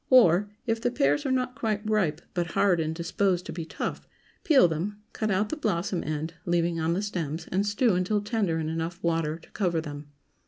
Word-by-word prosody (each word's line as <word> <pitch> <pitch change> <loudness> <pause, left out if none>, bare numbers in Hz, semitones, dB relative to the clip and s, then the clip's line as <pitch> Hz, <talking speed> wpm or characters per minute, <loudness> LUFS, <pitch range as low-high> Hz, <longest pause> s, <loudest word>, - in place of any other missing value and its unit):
Or, 205 -6 +6 0.2
If 225 -1 0
the 245 - +2
pears 145 - +1
are - - 0
not 255 -1 0
quite 215 -2 -2
ripe, 185 -8 +1
but 175 -1 0
hard 185 -4 +3
and 160 0 -1
disposed 180 +2 0
to - - -6
be 165 -2 -4
tough, - - -4 0.4
peel 275 - +6
them, 180 +6 -3
cut 215 - -1
out 205 +2 +1
the - - -1
blossom 190 - -1
end, 155 +2 -3
leaving 170 -2 +1
on 160 +1 +1
the 195 +4 -1
stems, 165 -5 -3
and 195 +3 +1
stew 210 +2 +3
until 185 +4 +1
tender 205 -6 0
in 160 -1 -2
enough 165 +2 -3
water 165 -2 0
to 165 - -20
cover 175 -5 0
them. 145 -2 -7
180 Hz, 205 wpm, -27 LUFS, 165-210 Hz, 0.4 s, Or